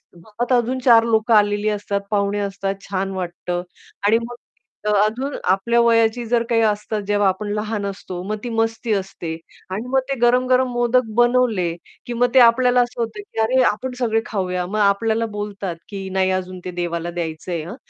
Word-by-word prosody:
घरात 215 +8 -5
अजून 250 +1 +1
4 230 -3 +7
लोकं 230 0 +2
आलेली 205 0 +3
असतात, 205 -1 -2
पाहुणे 205 0 +1
असतात, 195 -1 -2
छान 195 0 -2
वाटतं 175 -1 -3 0.5
आणि 220 +2 +5
मग 240 - -8 0.5
अजून 215 +7 +1 0.2
आपल्या 195 +5 +2
वयाची 230 0 +3
जर 235 0 +1
काही 230 -1 +3
असते 210 0 0
जेव्हा 205 -1 +2
आपण 190 +3 -3
लहान 210 -1 -2
असतो, 190 -2 -6
मग 210 +3 -3
ती 245 - -4
मस्ती 225 0 -1
असते 190 -4 -4 0.4
आणि 210 +6 -4
मग 265 +1 +2
ते 275 - 0
गरम-गरम 255 +2 +3
मोदक 240 0 +2
बनवले 240 -7 +3 0.3
की 240 - -4
मग 245 +1 +1
ते - - +9
आपल्याला 245 +1 +5
असं 240 0 -2
होतं, 230 - -4
की 410 - -9
अरे 255 +4 +3
आपण 255 +5 -5
सगळे 225 -2 +1
खाऊया. 180 -3 -2
मग 210 +4 -3
आपल्याला 220 +3 +2
बोलतात, 200 -3 -4
की 195 -2 -6
"नाही 190 0 +1
अजून 185 0 -3
ते 180 - -4
देवाला 175 -1 -3
द्यायचंय 165 -1 -4
हां, 180 - -7
215 Hz, 180 wpm, -21 LUFS, 195-235 Hz, 0.5 s, ते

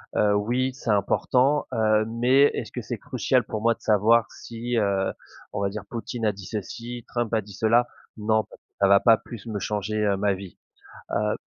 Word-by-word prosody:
heu, 105 -1 +3
oui, 125 +5 0
c'est 130 -3 -7
important, 125 +7 +2
heu, 110 -1 +2
mais 125 +5 +4
est-ce - - -5
que - - -5
c'est - - -5
crucial - - 0
pour 110 - -5
moi 115 +1 +3
de - - -33
savoir 110 +2 +4
si, 120 +1 -5
heu, 100 -3 +1 0.4
on - - -2
va 100 - +1
dire, 105 0 -6
Poutine 115 0 -4
a 105 - +3
dit 100 -1 -11
ceci, 115 +3 -6
Trump 120 -2 -2
a 110 - +2
dit 105 0 -13
cela? 115 +4 +3 0.3
Non, 110 0 +1
parce - - -18
que - - -
ça 100 - +6
va 100 0 +6
pas 115 -2 +5
plus 115 -3 -11
me 105 -3 -3
changer, 105 +1 -2
heu, 100 -1 +2
ma 100 0 +1
vie, 95 -1 -9 0.6
heu 105 0 0
110 Hz, 210 wpm, -25 LUFS, 105-120 Hz, 0.6 s, ça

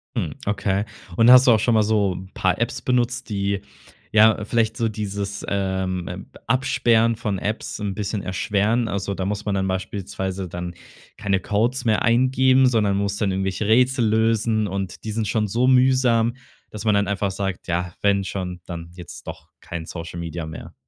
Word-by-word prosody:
Hm, - - -2
okay. 100 0 0 0.3
Und 115 +5 +5
hast 130 +1 +8
du - - +8
auch 110 - +5
schon 120 +2 +2
mal 110 - +4
so 105 -4 +1 0.2
paar 95 -1 0
Apps 115 0 -1
benutzt, 125 -1 0
die, 100 -1 -1 0.5
ja, 110 0 +5
vielleicht 115 0 0
so 115 - +1
dieses, 100 -1 -4
ähm, 95 -2 -1
äh, 90 - -5 0.3
Absperren 115 -2 +2
von 105 -3 -2
Apps 105 +2 -3
'n 105 -2 -2
bisschen 105 0 -3
erschweren? 105 +5 0
Also, 100 -1 -2
da 95 -1 -3
muss 105 +1 -3
man 105 -2 0
dann 95 0 0
beispielsweise 95 0 -4
dann 90 0 -6 0.4
keine 100 -2 0
Codes 115 +7 0
mehr 110 -2 +2
eingeben, 130 +2 +4
sondern 105 -5 +2
muss 100 0 -1
dann 100 -2 0
irgendwelche 95 +2 -2
Rätsel 125 +2 +3
lösen 110 0 +2
und 95 -1 -5
die 110 - -4
sind 110 0 -2
schon 105 +1 0
so 120 +6 +1
mühsam, 125 -3 +3 0.4
dass 105 0 -7
man 105 -2 +3
dann 100 0 +2
einfach 100 -1 -1
sagt: 95 -1 -4
„Ja, 85 +1 -2
wenn 100 -1 +2
schon, 90 -2 -5
dann 85 -1 -7
jetzt 90 -1 -11
doch - - -9
kein 85 -2 -6
Social 85 0 -7
Media 85 -1 -5
mehr.“ 80 0 -9
105 Hz, 180 wpm, -22 LUFS, 95-115 Hz, 0.5 s, hast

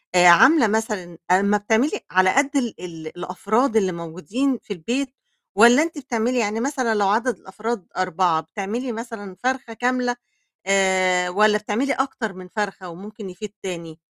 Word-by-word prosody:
آآ، 180 0 +7
عاملة 260 - +7
مثلًا 205 -5 -2
أمّا 200 +3 +4
بتعملي 220 +7 +1
على 185 0 +4
قد 280 +1 +3
ال 240 -5 -1
ال 165 -3 -8
الأفراد 215 +7 0
اللي 190 -4 +2
موجودين 185 +11 -2
في 205 - -6
البيت، 240 - -2 0.5
والّا 240 +7 +7
أنتِ 330 -1 -5
بتعملي 245 -2 -1
يعني 215 0 -1
مثلًا 255 -3 0
لو 205 -2 +2
عدد 230 +5 +1
الأفراد 210 +1 -5
4 180 -3 +1
بتعملي 205 - -4
مثلًا 225 -4 -7
فرخة 255 -2 -2
كاملة، 245 +1 0 0.5
آآ، 185 -2 +2
والّا 210 +3 +4
بتعملي 215 +6 -1
أكتر 260 -5 -2
من 185 -1 -11
فرخة، 195 -2 -4
وممكن 200 +3 -9
يفيض 195 +3 -8
تاني 170 -4 -6
210 Hz, 155 wpm, -22 LUFS, 185-245 Hz, 0.5 s, آآ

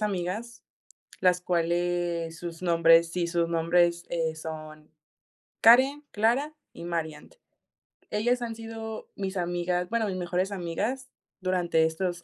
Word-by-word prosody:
amigas, 210 +4 -3 0.6
las 180 -1 +3
cuales 175 -1 -1
sus 170 0 -7
nombres 165 -1 +5
Sí, 175 -1 -1
sus 170 -1 0
nombres, 170 +1 +2
eh, 165 -2 -1
son 155 -1 -8 0.7
Karen, 265 +6 +6
Clara 250 +8 +1 0.2
y - - -10
Mariant. 160 - -4 0.7
Ellas 240 +4 +1
han 230 -1 -4
sido 225 -1 -7
mis 195 -1 -4
amigas, 175 0 -1
bueno, 230 -2 +1
mis 185 -2 -3
mejores 180 +2 -1
amigas 215 +9 -3 0.3
durante 175 -3 +2
estos 175 +2 -2
175 Hz, 125 wpm, -27 LUFS, 170-215 Hz, 0.7 s, Karen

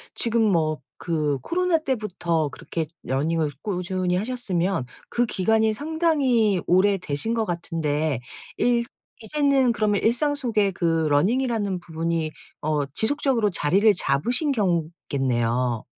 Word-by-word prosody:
지금 230 0 +1
뭐 155 -3 +1 0.3
그 155 -4 0
코로나 355 - +1
때부터 185 - -1
그렇게 160 +3 -4 0.2
running을 150 +3 0
꾸준히 185 -2 -1
하셨으면 190 - -1 0.2
그 240 - +1
기간이 220 +1 +2
상당히 275 - +1
오래 190 +3 +4
되신 180 +6 -2
것 230 -1 +1
같은데 160 - -2 0.3
일 240 -1 +2 0.4
이제는 275 0 +2
그러면 210 -3 +1
일상 245 +6 +2
속에 225 -8 +1
그 165 -3 0
running이라는 205 - +1
부분이 165 -1 -2 0.3
어 150 -1 0
지속적으로 240 - +1
자리를 195 +5 +3
잡으신 245 - +2
경우겠네요. 135 - -1
190 Hz, 320 characters per minute, -24 LUFS, 160-235 Hz, 0.4 s, 오래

